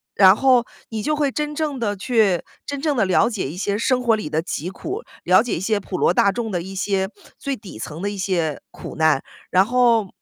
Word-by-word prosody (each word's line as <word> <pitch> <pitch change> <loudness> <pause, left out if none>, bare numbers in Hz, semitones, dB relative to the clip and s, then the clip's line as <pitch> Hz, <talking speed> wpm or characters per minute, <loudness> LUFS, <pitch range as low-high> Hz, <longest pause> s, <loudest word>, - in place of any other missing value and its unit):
然 190 -1 +7
后 255 -1 +4 0.2
你 220 -2 -4
就 305 +6 0
会 290 -2 +1
真 300 +2 -3
正 295 -3 -2
地 205 -3 -1
去 205 -3 +2 0.2
真 285 -1 -4
正 300 -3 0
地 220 - +3
了 185 +4 +3
解 205 - -3
一 155 - -7
些 200 +2 -1
生 250 +3 +1
活 230 -2 +4
里 210 - -5
的 155 +1 0
疾 170 0 -4
苦， 375 - -5 0.2
了 185 +3 +5
解 240 0 -2
一 - - -4
些 210 +2 +1
普 190 -1 -5
罗 - - +3
大 200 - +4
众 225 0 -3
的 175 -3 -1
一 190 +3 -8
些 190 0 0 0.3
最 280 -1 -3
底 195 - -11
层 155 +8 -6
的 200 - -1
一 205 - -6
些 175 -6 -1
苦 - - -9
难。 155 -3 +3 0.3
然 185 +1 +4
后 235 -2 +3
205 Hz, 255 characters per minute, -21 LUFS, 185-250 Hz, 0.3 s, 然